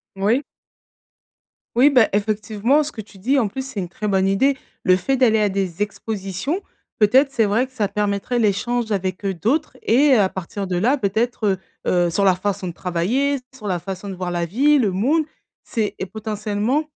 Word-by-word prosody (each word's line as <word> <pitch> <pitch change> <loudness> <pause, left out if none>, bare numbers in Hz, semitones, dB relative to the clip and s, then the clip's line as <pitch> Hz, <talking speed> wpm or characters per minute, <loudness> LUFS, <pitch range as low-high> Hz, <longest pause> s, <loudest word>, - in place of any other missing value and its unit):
Moui. 215 +8 +1 1.3
Oui, 260 +5 +6
bah, 250 -6 +4
effectivement 215 +6 +1
ce 300 - -6
que 220 - -7
tu 205 -1 -17
dis 265 +9 +1
en 230 - +2
plus, 265 +6 -5
c'est 250 -6 -6
une 180 -2 -4
très 210 +4 -4
bonne 190 -1 +2
idée. 265 +8 +2 0.3
Le 185 - +5
fait 265 +9 0
d'aller 230 -4 +4
à 210 -1 +2
des 190 -2 -3
expositions, 210 - -3 0.4
peut-être 260 +7 +4
c'est 225 -5 +2
vrai 225 +6 +1
que 260 - -27
ça 210 -5 0
permettrait 205 +4 -1
l'échange 225 +2 0
avec, 190 -1 -2
heu, 195 - 0
d'autres 270 - -1
et 275 +5 +4
à 205 -6 +4
partir 190 +2 -5
de 180 - -2
là 250 +10 +2
peut-être, 220 +1 0
heu, 190 - +2 0.3
heu, 175 -1 +3
sur 200 +4 +1
leur 185 -2 +3
façon 195 -1 -2
de 175 - -5
travailler, 225 +13 0 0.2
sur 230 -5 -8
la 180 -3 0
façon 195 +2 -6
de 190 - -5
voir 180 -1 -4
la 175 -1 -1
vie, 280 - +3
le 215 -6 +2
mood, 270 - +2 0.4
c'est 220 -4 -2
est - - -2
potentiellement, 215 +6 -2
210 Hz, 200 wpm, -21 LUFS, 195-250 Hz, 1.3 s, Oui